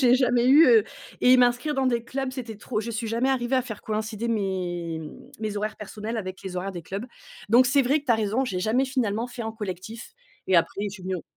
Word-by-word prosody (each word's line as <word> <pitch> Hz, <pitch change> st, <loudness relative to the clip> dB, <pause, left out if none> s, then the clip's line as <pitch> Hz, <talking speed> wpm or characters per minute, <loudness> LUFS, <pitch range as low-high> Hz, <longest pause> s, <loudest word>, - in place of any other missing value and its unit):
j'ai 250 Hz, -2 st, +6 dB
jamais 250 Hz, -2 st, +3 dB
eu, 295 Hz, +5 st, +8 dB
heu 450 Hz, -3 st, +6 dB, 0.4 s
et 255 Hz, +1 st, +6 dB
m'inscrire 245 Hz, +4 st, +2 dB
dans 265 Hz, -1 st, +1 dB
des 235 Hz, -2 st, 0 dB
clubs 265 Hz, +2 st, -3 dB
c'était 240 Hz, -5 st, -6 dB
trop, 215 Hz, +1 st, -3 dB
je 235 Hz, +2 st, -5 dB
suis 225 Hz, +1 st, -3 dB
jamais 235 Hz, +4 st, +1 dB
arrivée 260 Hz, 0 st, +1 dB
à 255 Hz, -, +2 dB
faire 220 Hz, -4 st, -7 dB
coïncider 220 Hz, +1 st, -3 dB
mes 180 Hz, -6 st, -2 dB
mmh 155 Hz, -1 st, -10 dB
mes 215 Hz, -1 st, -3 dB
horaires 215 Hz, +1 st, -3 dB
personnels 215 Hz, +2 st, -6 dB
avec 185 Hz, -2 st, -6 dB
les 185 Hz, -1 st, -6 dB
horaires 190 Hz, +2 st, -2 dB
des 175 Hz, -2 st, -7 dB
clubs. 195 Hz, +8 st, -5 dB, 0.4 s
Donc 240 Hz, +4 st, +6 dB
c'est 270 Hz, +3 st, +4 dB
vrai 280 Hz, +4 st, +2 dB
que -, -, -23 dB
tu 240 Hz, -, +4 dB
as -, -, +5 dB
raison 220 Hz, +4 st, 0 dB
j'ai 190 Hz, -8 st, -3 dB
jamais 230 Hz, +7 st, +2 dB
finalement 240 Hz, -4 st, -1 dB
fait 240 Hz, -1 st, -7 dB
en 220 Hz, 0 st, -4 dB
collectif 210 Hz, -, -7 dB, 0.3 s
et 185 Hz, -, +4 dB
après 170 Hz, +4 st, +1 dB
je -, -, -1 dB
suis 190 Hz, -, -11 dB
venue 185 Hz, 0 st, -2 dB
on 175 Hz, -, -8 dB
225 Hz, 250 wpm, -25 LUFS, 200-255 Hz, 0.4 s, eu